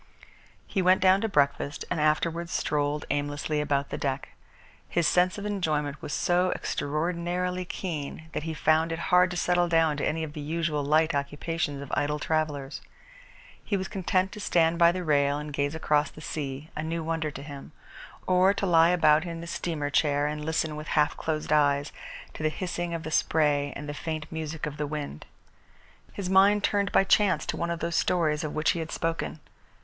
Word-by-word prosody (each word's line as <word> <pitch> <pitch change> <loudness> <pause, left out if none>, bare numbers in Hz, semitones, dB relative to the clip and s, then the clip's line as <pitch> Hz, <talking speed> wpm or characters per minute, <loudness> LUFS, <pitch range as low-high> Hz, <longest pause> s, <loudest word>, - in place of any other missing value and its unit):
He 195 - -1
went 185 +1 +5
down 190 +1 +4
to 225 - 0
breakfast 145 -3 0
and 170 -4 0
afterwards 165 +2 +1
strolled 145 0 -1
aimlessly 145 +1 -1
about 140 -1 0
the - - -3
deck. 135 -1 -2 0.6
His 170 -2 +2
sense 180 +2 +3
of 205 - -5
enjoyment 155 -8 -1
was - - -6
so 180 +3 +2
extraordinarily 175 +4 -2
keen 160 -4 -5
that - - -2
he 160 +1 -4
found 160 +2 +2
it 165 - -2 0.2
hard 180 0 +6
to 180 - -4
settle 175 0 +2
down 165 -3 +3
to 140 - -3
any 160 +1 0
of 150 -2 -6
the 150 - -6
usual 155 -1 -1
light 155 +3 +3
occupations 145 +1 -2
of 140 - -10
idle 150 +1 0
travellers. 150 -3 -2 0.8
He 200 - -1
was 190 - -3
content 190 0 0
to - - -8
stand 170 -4 +2
by 170 0 +7
the 180 +1 -4
rail 145 -2 +2
and 150 0 -6
gaze 145 +2 -1
across 150 -2 +1
the - - -14
sea, 145 -1 -5
a - - -2
new 165 +1 -3
wonder 160 -1 -1
to 140 -1 -8
him; 140 -2 -9 0.5
or 185 +2 +4
to 200 - -1
lie 165 -2 +5
about 155 -3 +4
in 170 -2 -5
his 170 0 -6
steamer 160 -4 -3
chair 145 -1 +2
and 150 0 -3
listen, 160 0 -1
with 155 0 -7
half 150 +1 +3
closed 155 -1 -3
eyes, 145 -1 +2 0.4
to - - -8
the 155 - +2
hissing 175 0 -3
of 165 - -5
the 160 - -5
spray 145 -3 +2
and 145 - -6
the 145 - -4
faint 155 +1 -4
music 160 -1 -4
of 150 -1 -6
the 150 - -2
wind. 145 - -6 0.8
His 200 -3 -5
mind 195 +2 +5
turned 200 -1 +1
by - - +5
chance 190 -5 +3
to - - -2
one 170 - -2
of 170 -1 -3
those 170 0 -1
stories 160 -3 +1
of 150 - -4
which 155 +1 +2
he 170 - -3
had 160 -1 -5
spoken. 165 -1 -2
160 Hz, 195 wpm, -27 LUFS, 150-175 Hz, 0.8 s, by